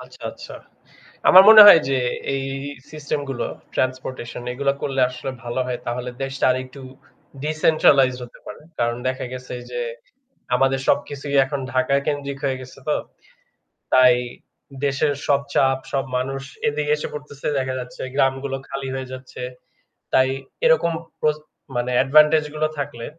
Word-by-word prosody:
আচ্ছা, - - -14
আচ্ছা। - - -11 0.8
আমার 185 +1 +10
মনে 220 -1 +12
হয় 185 -5 +10
যে 135 - +1 0.4
এই 135 - -2 0.5
সিস্টেম 150 -1 -4
গুলো 130 - -3 0.3
ট্রান্সপোর্টেশন 130 -2 -3
এগুলা 140 +2 0
করলে 135 -1 -1
আসলে 125 +1 -6
ভালো 120 +2 -2
হয় 125 -1 -3
তাহলে 125 +1 -3
দেশটা 135 0 -3
আরেকটু 130 +1 -4 0.6
ডিসেন্ট্রালাইজড 150 -4 +3
হতে 120 - -15
পারে। - - -9 0.2
কারণ 120 0 0
দেখা 130 0 -3
গেছে 125 0 -7 0.2
যে 120 0 -4 0.7
আমাদের 135 +1 +2
সবকিছুই 140 0 0
এখন 140 +1 -4
ঢাকা 130 +1 +1
কেন্দ্রিক 140 -2 -3
হয়ে 135 -1 0
গেছে 130 0 -12
তো। 150 - +2 1.0
তাই 130 -1 +7 0.7
দেশের 140 +1 +1
সব 140 -1 +3
চাপ 135 -1 +3
সব 135 -1 0
মানুষ 135 +2 -3 0.3
এদিকে 150 0 -1
এসে - - -5
পড়তেছে 145 -1 -8
দেখা 130 -1 -2
যাচ্ছে 125 0 -9
গ্রামগুলো 135 0 0
খালি 135 -1 -5
হয়ে 130 -1 -5
যাচ্ছে। 130 0 -10 0.7
তাই 130 0 +5 0.4
এরকম 485 - +4 0.3
প্রস 150 0 +1 0.4
মানে 120 +1 -1
অ্যাডভান্টেজ 150 +3 +5
গুলো 155 0 0
থাকলে 135 -5 -5
135 Hz, 140 wpm, -22 LUFS, 130-145 Hz, 1.0 s, মনে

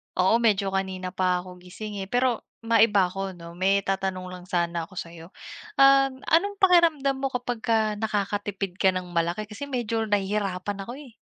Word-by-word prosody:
Oo, 190 +6 +3
medyo 200 -4 +2
kanina 190 -1 -3
pa 180 -1 +1
ako 180 -1 -12
gising 200 +3 -8
eh, - - -17
pero. 245 +1 0
Maiba 225 -4 +4
ako 190 0 -5
no, 170 0 -10
may 195 +2 +1
tatanong 190 -1 -2
lang 180 -1 -9
sana 170 -1 -1
ako 185 - -15
sayo, 165 0 -8 0.5
um, 275 -1 +5
anong 400 +5 +2
pakiramdam 335 -7 +4
mo 270 - 0
kapagka 230 -3 0
nakakatipid 205 -2 -2
ka 190 - +6
ng 180 -1 -7
malaki 170 +5 0
kasi 220 +7 -8
medyo 230 -4 -2
nahihirapan 200 -1 -1
ako, 240 +6 -7
eh. 280 -5 -12
200 Hz, 165 wpm, -25 LUFS, 185-235 Hz, 0.5 s, ka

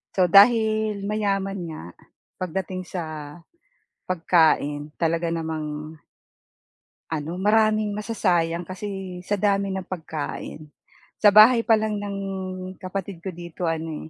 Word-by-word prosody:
So 180 -3 +3
dahil 215 -1 +5
mayaman 200 -2 -1
nga 155 -1 -7 0.6
pagdating 185 0 -4
sa 180 -3 -4 1.0
pagkain 155 -4 +2
talaga 165 0 0
namang 155 -1 -4 1.1
ano 160 +2 -3
maraming 215 +1 +2
masasayang 180 -5 0
kasi 190 -1 -6
sa 205 +3 -1
dami 200 0 +1
ng 190 -1 -4
pagkain. 155 -2 -6 0.6
Sa 210 - +8
bahay 215 +4 +7
pa 225 -1 +4
lang 215 -1 -2
ng 200 -1 -4 0.6
kapatid 185 -1 -5
ko 190 - -4
dito 170 -1 -5
ano, 160 -1 -4
185 Hz, 110 wpm, -24 LUFS, 165-205 Hz, 1.1 s, Sa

